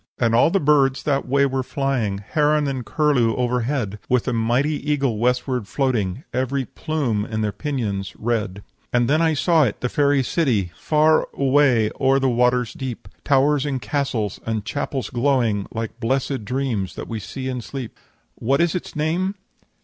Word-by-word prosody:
"'And 115 -2 +1
all 120 - +5
the 195 - +2
birds 140 -3 +3
that 140 -3 0
way 140 +2 +3
were 135 -1 -1
flying, 130 -7 -1
Heron 150 -1 +2
and 130 -2 -3
curlew 125 -6 +2
overhead, 125 -3 -1
With 125 0 +1
a 125 - 0
mighty 135 +7 0
eagle 135 -7 0
westward 125 -1 0
floating, 120 -4 -1
Every 130 +2 -1
plume 135 -8 -2
in 110 0 -3
their 105 -1 0
pinions 100 -8 -3
red. 105 -4 -2 0.3
"'And 120 -1 +2
then 155 +3 +3
I 160 -1 +2
saw 165 +1 +3
it, 110 -7 -1
the 125 - -1
fairy 140 -1 +2
city, 120 - 0
Far 155 0 +3
away 135 -5 +3
o'er 135 0 +4
the 135 -1 +2
waters 125 -1 +2
deep; 130 -3 -6
Towers 140 0 +3
and 140 -3 -2
castles 110 -3 -2
and 110 -2 -3
chapels 135 -2 -3
glowing 120 -6 +1
Like 115 +1 -5
blesséd 130 0 -1
dreams 125 -6 -2
that - - -6
we 115 -2 -4
see 130 +5 -6
in 125 -2 -3
sleep. 125 +1 -7 0.4
"'What 135 - 0
is 170 -1 +2
its 180 - -5
name?' 170 +6 0
130 Hz, 170 wpm, -22 LUFS, 115-145 Hz, 0.4 s, all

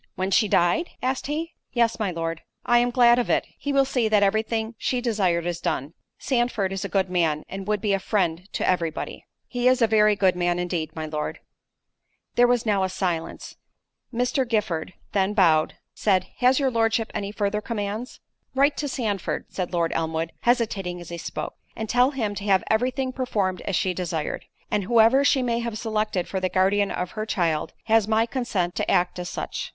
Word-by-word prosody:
"When 190 +1 -2
she 210 +3 +4
died?" 185 - +2
asked 260 +1 -1
he. 320 +3 -3 0.2
"Yes, 235 -2 +2
my 210 -3 0
Lord." 165 -1 -3 0.2
"I 240 0 +5
am 245 0 +2
glad 240 -1 +5
of 245 - -1
it—he 285 - -1
will 275 -1 +4
see 250 -4 +1
that 210 -1 +4
every 210 +2 +3
thing 225 0 -3
she 250 - 0
desired 195 -8 +1
is 175 -1 -2
done—Sandford 200 - -2
is 195 - -3
a - - -4
good 195 -2 +1
man, 165 -4 0
and 195 +1 -7
would 210 -1 0
be 205 -2 +1
a 195 - +1
friend 180 -2 -1
to - - -1
every 175 -3 +2
body." 160 - -7 0.2
"He 245 -1 -1
is 255 0 +4
a 235 - +5
very 215 -1 +4
good 190 -3 +3
man 175 0 +1
indeed, 175 -3 -3
my 160 -1 -4
Lord." 155 -1 -4 0.9
There 245 0 +5
was 245 -1 +1
now 205 -3 +2
a 190 - 0
silence.——Mr. 230 - -4
Giffard 190 -7 -1 0.2
then 200 +1 +1
bowing, 160 -6 +4 0.2
said, 185 -3 +2
"Has 255 +2 +4
your 270 -2 +1
Lordship 225 -1 +1
any 200 0 -3
further 210 0 -1
commands?" 215 +2 -4 0.3
"Write 280 +2 +3
to 295 - -2
Sandford," 215 -8 -2
said 185 -2 -3
Lord 170 -2 0
Elmwood, 160 0 -2
hesitating 215 -7 0
as 175 - -10
he 170 0 -6
spoke, - - -5 0.2
"and 220 - -4
tell 245 +3 +4
him 230 -8 -2
to 200 0 -6
have 195 -2 +3
every 230 +4 +3
thing 260 0 -2
performed 205 -8 -1
as 195 - -1
she 185 +2 +1
desired. 170 -4 -3 0.3
And 210 -2 0
whoever 235 +5 +5
she 270 -2 +3
may 235 -1 0
have 235 -2 -3
selected 215 -4 -1
for 190 - -2
the 185 0 0
guardian 195 +2 +2
of 180 0 -3
her 215 0 -4
child, 165 -7 0
has 225 -2 +3
my 220 +1 +3
consent 230 -8 -2
to - - -1
act 180 0 +2
as 180 0 -4
such. - - -4
205 Hz, 200 wpm, -24 LUFS, 180-240 Hz, 0.9 s, I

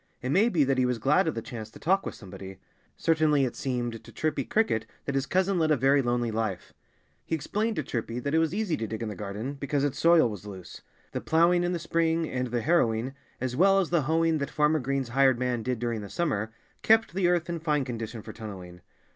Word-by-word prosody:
It 130 - -3
may 205 +9 +4
be 165 -9 +3
that 135 -1 +1
he 130 - +3
was 125 -1 0
glad 150 - +3
of 160 - -1
the 115 - -4
chance 110 -3 -7
to - - -14
talk 190 +4 +1
with - - -5
somebody. 95 -1 -10 0.4
Certainly 155 -4 +3
it 125 - -4
seemed 120 -4 -3
to - - -13
Chirpy 155 -3 -1
Cricket 120 - 0 0.2
that 140 - -2
his 135 0 0
cousin 190 0 +1
led 160 -1 +2
a 150 - +4
very 135 +3 +4
lonely 120 -2 0
life. 110 -4 -3 0.5
He 165 - -1
explained 210 +9 -1
to 155 - -1
Chirpy 115 -2 -4
that 140 +4 -3
it 160 - +4
was 160 -1 +1
easy 200 -3 -1
to 110 - -3
dig 110 +1 -4
in 110 - -3
the 105 - -6
garden, 105 +6 -5
because 140 0 -2
its 140 -1 -1
soil 165 -5 +5
was 105 -2 -7
loose. 95 -3 -9 0.3
The - - -3
ploughing 170 +2 +3
in 175 +1 0
the - - 0
spring, 165 0 0
and 125 -2 -2
the 120 0 -1
harrowing, 130 -6 +2 0.3
as 130 -1 -2
well 195 +6 +5
as 190 -4 +1
the 170 -3 +3
hoeing 160 +2 +1
that 140 - -2
Farmer 150 +1 +2
Green's 135 -1 -2
hired 135 0 +4
man 125 -1 -1
did 125 +2 -2
during 115 -1 -2
the 100 - -8
summer, 110 - -1 0.3
kept 225 -3 +4
the 185 -1 +2
earth 175 -1 +1
in 170 -1 -3
fine 150 -4 0
condition 115 -2 -5
for 110 - -9
tunnelling. 95 -5 -9
135 Hz, 240 wpm, -27 LUFS, 115-165 Hz, 0.5 s, soil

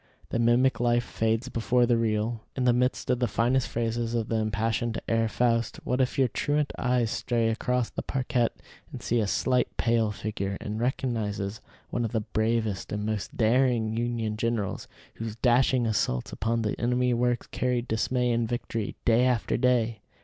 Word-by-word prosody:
The - - -1
mimic 120 +3 +3
life 120 0 +2
fades 115 +2 -1
before 120 0 +2
the 120 0 +3
real. 110 0 0
In 130 - -1
the 125 -1 +4
midst 125 +1 0
of 125 - +1
the 125 - +2
finest 125 +3 +1
phrases 115 0 -2
of 115 -2 -1
the 115 - +1
impassioned 110 +2 -1
Herr 115 0 +2
Faust, 115 +1 +1
what 125 +1 0
if 130 - 0
your 135 -2 +4
truant 145 +3 -1
eyes 125 -3 +1
stray 115 -2 0
across 125 +2 0
the - - -4
parquette 125 -3 -1 0.3
and - - -8
see 120 - +1
a 105 - +1
slight, 125 +4 0
pale 115 -2 +2
figure, 100 -2 -3
and 105 +1 -4
recognize 110 -5 -2 0.3
one 120 - -1
of 115 - -3
the 110 - +1
bravest 110 -2 -1
and 105 0 -2
most 110 -2 -3
daring 115 -1 +2
Union 115 -2 -1
generals, 115 -3 -2 0.3
whose 110 -1 -5
dashing 125 +1 +3
assaults 100 - 0
upon 115 0 -1
the 105 - 0
enemy's 125 +1 +2
works 120 0 0
carried 125 -1 -1
dismay 125 +2 +1
and 115 -1 0
victory 115 -3 -3
day 115 +1 +4
after 125 -4 +1
day? 120 -3 +2
115 Hz, 175 wpm, -27 LUFS, 110-125 Hz, 0.3 s, the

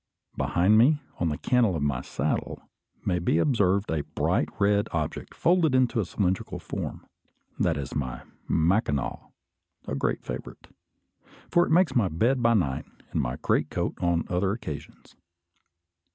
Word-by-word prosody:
Behind 100 +5 +3
me, 145 +6 +5 0.2
on 85 - +1
the 75 - -2
cantle 120 -7 +2
of 75 - -1
my 70 -3 0
saddle, - - -3 0.4
may 90 - +1
be 85 -2 +1
observed 100 - +2
a 80 -2 0
bright - - 0
red 100 0 +3
object 75 -3 -3
folded 165 -5 +3
into 125 -3 +3
a 105 - +1
cylindrical 95 0 -1
form. - - -6 0.5
That - - +2
is 70 0 -5
my 65 -4 -3 0.3
"Mackinaw," 80 -4 0 0.6
a - - -3
great 70 - -1
favourite, - - -7 0.8
for 175 0 +4
it - - -3
makes 180 +2 +4
my 115 -6 +3
bed 115 +11 +1
by 115 0 +4
night 75 -10 0 0.3
and - - 0
my - - -2
greatcoat - - 0
on 85 -1 +1
other 95 +2 0
occasions. 75 -10 -8
95 Hz, 150 wpm, -27 LUFS, 80-115 Hz, 0.8 s, me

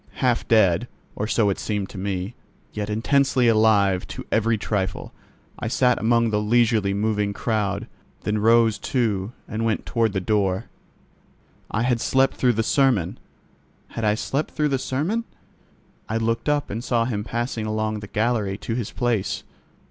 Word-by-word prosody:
Half 125 -3 0
dead, 110 -1 +4 0.3
or 105 - -2
so 110 -2 +2
it - - -4
seemed 105 -3 -2
to - - -10
me, 95 +2 -3 0.4
yet 105 0 -3
intensely 130 +3 +2
alive 105 -4 +3
to - - -7
every 115 0 +2
trifle, 100 -2 -3 0.5
I - - -3
sat 125 +1 +2
among 115 0 +2
the 105 0 +1
leisurely 110 -2 +2
moving 105 0 0
crowd, 100 -3 -1 0.4
then 105 0 -1
rose 115 0 +4
too 110 -5 -1 0.2
and 110 0 -3
went 110 -1 0
toward 115 -3 +1
the 95 - 0
door. 95 -1 0 1.0
I 115 - -1
had 120 -2 +1
slept 135 0 +2
through 125 -2 +2
the 115 0 0
sermon. 120 - +2 0.7
Had 115 - -5
I 105 -1 +3
slept 140 +6 -2
through 150 -1 +1
the 135 -2 0
sermon? 160 - -1 0.9
I 110 - 0
looked 115 +5 -1
up 145 -1 0
and 115 +4 -4
saw 120 -3 +1
him 105 -4 -2
passing 120 -1 -3
along 110 0 -1
the 105 - -8
gallery 105 -2 0
to 115 - -4
his 115 -3 -2
place. 105 -5 -1
110 Hz, 165 wpm, -23 LUFS, 105-120 Hz, 1.0 s, dead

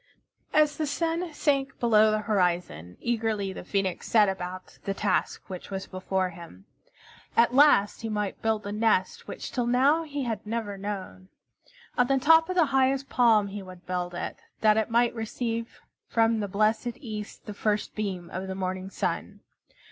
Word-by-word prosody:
As 300 -1 +3
the 310 - -1
sun 330 +3 -1
sank 275 -2 0
below 220 -2 +5
the 215 0 +1
horizon, 175 - -1
eagerly 220 -4 -1
the - - -8
Phoenix 190 -1 -2
set 215 -3 +5
about 185 -1 -5
the 195 - -2
task 195 -2 0
which 185 -2 -8
was 195 -1 -4
before 185 0 -2
him. 165 - -12 0.7
At 235 +1 +5
last 265 -7 +5
he 225 - -3
might 210 -2 -3
build 220 -1 0
the 200 - -5
nest 210 -3 +1
which - - -6
till 245 -2 -1
now 270 +6 +4
he 290 -3 -4
had 230 -3 -3
never 215 -2 -3
known. 195 -1 -6 0.7
On 245 - +5
the 275 0 +3
top 320 +5 +5
of 370 - -2
the 345 -3 +5
highest 270 +1 +2
palm 220 -5 +4
he 205 +1 -6
would 185 -1 -12
build 180 -1 -3
it, - - -4 0.2
that 215 -1 +5
it 220 +1 +1
might 235 +1 +3
receive 230 0 -4 0.3
from 225 -1 +2
the 205 - -2
blessed 215 +4 +1
East 215 -5 -7
the 210 - -6
first 210 0 -1
beam 190 -5 -4
of 190 +1 -4
the 190 - -4
morning 185 0 -3
sun. - - -3
215 Hz, 175 wpm, -27 LUFS, 190-245 Hz, 0.7 s, below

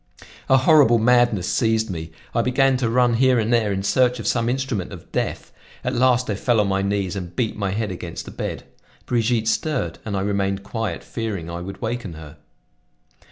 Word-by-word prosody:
A 130 - +6
horrible 135 -4 +5
madness 120 -5 +3
seized 110 -2 +1
me; 80 -2 -6 0.2
I 115 - +2
began 130 +2 +3
to 125 -3 0
run 120 0 +3
here 130 0 +4
and 115 +1 +1
there 110 -3 +2
in 95 0 -2
search 125 +4 +2
of 115 - -6
some 115 +2 +1
instrument 125 -7 -2
of - - -11
death. - - -3 0.3
At 125 - -1
last 125 0 +3
I 105 - 0
fell 115 +3 +1
on 105 - +2
my 95 0 +1
knees 100 -1 -1
and 90 -2 -6
beat 115 0 -1
my 100 -2 -2
head 105 +1 -2
against 85 -2 -6
the - - -9
bed. - - -5 0.4
Brigitte 115 -2 +1
stirred 115 - -1
and 100 -3 -3
I - - -1
remained 100 -1 -1
quiet, 105 -5 -4
fearing 100 -8 -4
I 85 +1 -5
would 95 +2 -8
waken 115 -5 -3
her. 75 -1 -11
110 Hz, 200 wpm, -22 LUFS, 95-125 Hz, 0.4 s, A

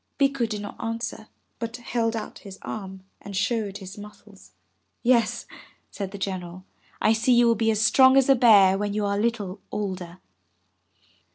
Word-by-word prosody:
'' - - -48
Bikku 275 -4 +1
did 210 -1 -4
not 205 - -8
answer, 225 -1 -4 0.3
but 230 0 -5
held 230 -1 -1
out 215 -1 -6
his 195 -2 -11
arm 190 -3 -7 0.2
and 200 -1 -6
showed 205 -2 -1
his 195 +1 -10
muscles. 210 -1 -14 0.5
"Yes," 235 -3 +2 0.5
said 195 -2 -5
the 200 - -8
General, 185 -2 -5 0.3
"I 215 - +3
see 225 +3 +2
you 240 0 +5
will 235 - +5
be 225 0 0
as 215 -1 +1
strong 260 +2 +6
as 270 - +4
a 275 - +7
bear 205 -6 +6
when 205 0 -2
you 210 -1 0
are 200 0 0
a - - 0
little 210 -4 -2
older. 185 -4 -4
210 Hz, 180 wpm, -25 LUFS, 195-230 Hz, 0.5 s, a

